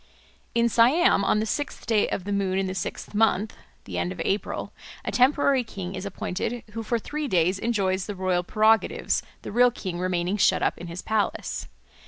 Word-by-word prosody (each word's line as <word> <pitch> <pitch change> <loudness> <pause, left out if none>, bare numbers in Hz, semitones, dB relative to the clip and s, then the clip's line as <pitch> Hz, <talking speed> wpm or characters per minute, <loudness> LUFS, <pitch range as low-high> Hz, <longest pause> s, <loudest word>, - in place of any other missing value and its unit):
In 235 0 +4
Siam 235 - +4
on 210 - +2
the 215 - 0
sixth 290 +6 -3
day 220 -3 +2
of 185 - -3
the 205 - -4
moon 195 -1 0
in 195 - +1
the 185 - -3
sixth 190 - -5
month 215 -1 +2 0.3
(the - - -4
end 175 - -1
of 180 - -8
April) 200 +2 -2 0.3
a - - -1
temporary 270 0 +3
king 195 -5 -6
is 190 +1 -5
appointed, 200 +5 -3
who 225 +2 -4
for 235 +2 0
three 295 +6 -4
days 185 -2 +2
enjoys 195 -5 0
the 205 - -4
royal 185 -1 +1
prerogatives, 215 +4 +2 0.2
the - - -6
real 245 +3 +5
king 185 -7 -5
remaining 180 +1 0
shut - - +3
up - - +1
in 175 - -7
his 170 +2 -7
palace. 220 -2 -1
205 Hz, 195 wpm, -25 LUFS, 185-230 Hz, 0.3 s, real